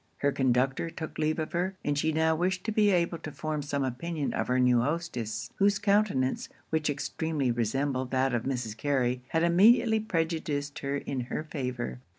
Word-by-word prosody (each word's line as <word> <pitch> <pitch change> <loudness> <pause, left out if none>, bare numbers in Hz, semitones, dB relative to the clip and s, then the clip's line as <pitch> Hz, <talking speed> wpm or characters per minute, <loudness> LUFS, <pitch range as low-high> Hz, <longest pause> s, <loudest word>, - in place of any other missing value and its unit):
Her 140 - +1
conductor 135 +4 +1
took 160 -1 -7
leave 155 0 +1
of 155 -1 -3
her; 185 +2 -1
and 145 - +1
she 160 +2 +1
now 160 +1 +2
wished 180 +2 0
to 220 - -2
be 210 -1 +4
able 170 -3 +1
to 155 - -7
form 155 0 -3
some 140 -1 -2
opinion 145 +4 -2
of - - -1
her 125 0 +2
new 125 -1 +4
hostess; 125 -6 -3
whose 200 0 +3
countenance, 200 -10 +1 0.2
which 155 -1 +1
extremely 145 -1 -1
resembled 130 +3 -1
that 130 0 +1
of 120 - +1
Mrs. 125 -4 -3
Carey, 125 -1 0
had 165 0 +1
immediately 220 +6 +5
prejudiced 160 -7 -2
her 140 0 -2
in 140 -1 -4
her 150 - -3
favour. 125 - -4
145 Hz, 180 wpm, -29 LUFS, 130-170 Hz, 0.2 s, immediately